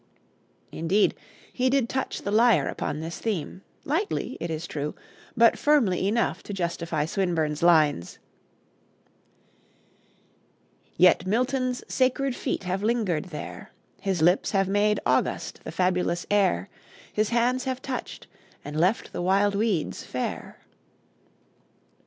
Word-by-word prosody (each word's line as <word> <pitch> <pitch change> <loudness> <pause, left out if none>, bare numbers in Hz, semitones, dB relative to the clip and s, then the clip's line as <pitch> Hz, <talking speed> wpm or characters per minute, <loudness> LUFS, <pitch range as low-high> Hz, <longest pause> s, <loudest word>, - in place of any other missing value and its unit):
Indeed, 185 +6 +2 0.4
he 255 0 +1
did 265 -3 +2
touch 265 +2 -3
the 200 - -2
lyre 220 - +4
upon 150 - -3
this 165 +1 -6
theme, 190 -4 -3 0.2
lightly, 335 +9 -1
it 170 - -4
is 160 +1 -4
true, 150 -2 -4 0.4
but 230 0 +5
firmly 230 -12 +3
enough 230 +3 0
to 205 - -7
justify 170 -4 -2
Swinburne's 160 -4 -1
lines: 155 - +3 2.8
"Yet 180 0 +5
Milton's 255 +3 0
sacred 260 0 +1
feet - - -3
have 185 +1 -2
lingered 210 -7 0
there, 170 -5 -8 0.3
His 190 -5 -1
lips 180 +3 +3
have 195 -2 +1
made 205 +1 +2
august - - 0
the - - -6
fabulous 180 -2 0
air, 190 - +2 0.5
His 215 0 +1
hands 245 +2 +1
have 260 -1 -2
touched 260 -1 -6 0.4
and 150 +1 -4
left 185 +7 +1
the - - -3
wild 195 +3 +2
weeds 200 -5 -1
fair." - - -5
195 Hz, 120 wpm, -26 LUFS, 170-235 Hz, 2.8 s, but